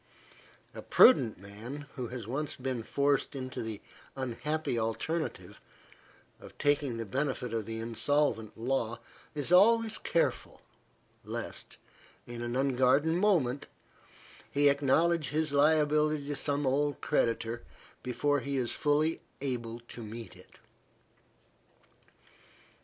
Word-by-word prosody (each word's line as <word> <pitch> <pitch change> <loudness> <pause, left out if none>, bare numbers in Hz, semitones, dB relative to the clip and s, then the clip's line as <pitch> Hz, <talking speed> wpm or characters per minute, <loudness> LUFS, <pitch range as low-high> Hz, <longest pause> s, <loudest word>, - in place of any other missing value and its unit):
A - - -7
prudent 130 - +6
man, 110 +9 -8
who 125 -2 -4
has 120 -2 -6
once 140 +6 -3
been 130 -2 -3
forced 140 +4 0
into 130 -1 -5
the 110 -2 -5 0.3
unhappy 135 +1 -2
alternative 155 +9 -3 0.8
of - - -14
taking 145 -4 +1
the 115 - -4
benefit 130 0 -2
of 110 -3 -2
the 115 0 -4
insolvent 115 0 0
law, 120 -1 -1 0.4
is 145 +2 0
always 220 +4 +5
careful, 170 - -1 0.6
lest, - - -5 0.5
in 120 0 -7
an 120 +1 -3
unguarded 135 +3 +3
moment, 165 -9 +2 0.8
he 145 0 +4
acknowledge 150 +4 +2
his 155 -1 0
liability 150 0 +3
to 145 0 -3
some 145 0 0
old 145 +1 +1
creditor, 115 0 0 0.4
before 140 +4 0
he 140 +1 -3
is 125 -3 0
fully 150 +2 +1 0.2
able 120 -4 -3
to 120 0 -11
meet 115 +1 -8
it. - - -17
135 Hz, 115 wpm, -30 LUFS, 120-150 Hz, 0.8 s, prudent